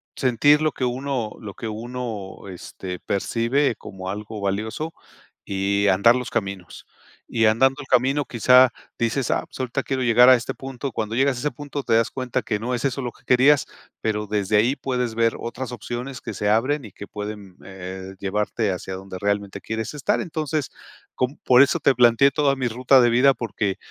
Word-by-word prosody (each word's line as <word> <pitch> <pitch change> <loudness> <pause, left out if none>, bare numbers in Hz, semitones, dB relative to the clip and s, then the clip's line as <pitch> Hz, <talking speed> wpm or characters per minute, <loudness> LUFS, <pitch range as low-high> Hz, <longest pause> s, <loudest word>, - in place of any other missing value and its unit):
sentir 140 +4 +3
lo 155 0 +2
que 130 - -3
uno 125 -3 -2
lo 100 -3 -8
que 115 - -6
uno, 110 -3 -6
este, 90 0 -7
percibe 115 +6 0
como 95 -2 -8
algo 105 +2 -6
valioso 110 +11 -3 0.5
y 100 +1 0
andar 100 +6 +5
los 125 -1 -3
caminos. 95 -4 -4 0.4
Y 115 -1 +1
andando 130 +5 +3
el 140 - -11
camino 135 +3 +2
quizá 125 +2 +5 0.3
dices, 120 +2 0
ah, - - 0
pues - - -13
ahorita 130 +1 -1
quiero 130 -1 -2
llegar 120 +1 +6
a 130 - +9
este 120 - -3
punto, 135 0 -6
cuando 110 -1 -3
llegas 135 +1 +2
a - - -4
ese 150 +4 -1
punto 145 +2 -6
te 115 - 0
das 115 0 +3
cuenta 130 -2 -2
que 105 -2 -2
no 125 +3 -2
es 120 - -3
eso 135 0 -1
lo 120 -2 -4
que - - -24
querías, 135 +3 +4 0.4
pero 105 -1 -1
desde 105 0 +1
ahí 120 +6 +3
puedes 125 -5 -2
ver 115 0 +2
otras 125 +2 -5
opciones 120 +2 -6
que - - -6
se 105 - -1
abren 130 +6 +1
y 105 - -11
que 100 - -10
pueden, 105 -3 -7
eh, 95 0 -8
llevarte 105 +2 -1
hacia 95 +1 -5
donde 95 0 -8
realmente 100 0 -2
quieres 110 +2 -4
estar. 145 - 0
Entonces 155 -4 -3 0.4
com 130 +3 -1
por 125 0 +6
eso 140 - +1
te 135 - +3
planteé 120 +3 +5
toda 140 -2 +2
mi 130 -2 -1
ruta 125 +3 +4
de 120 - +4
vida 130 +4 +5
porque, 110 -5 -3
120 Hz, 195 wpm, -23 LUFS, 105-130 Hz, 0.5 s, a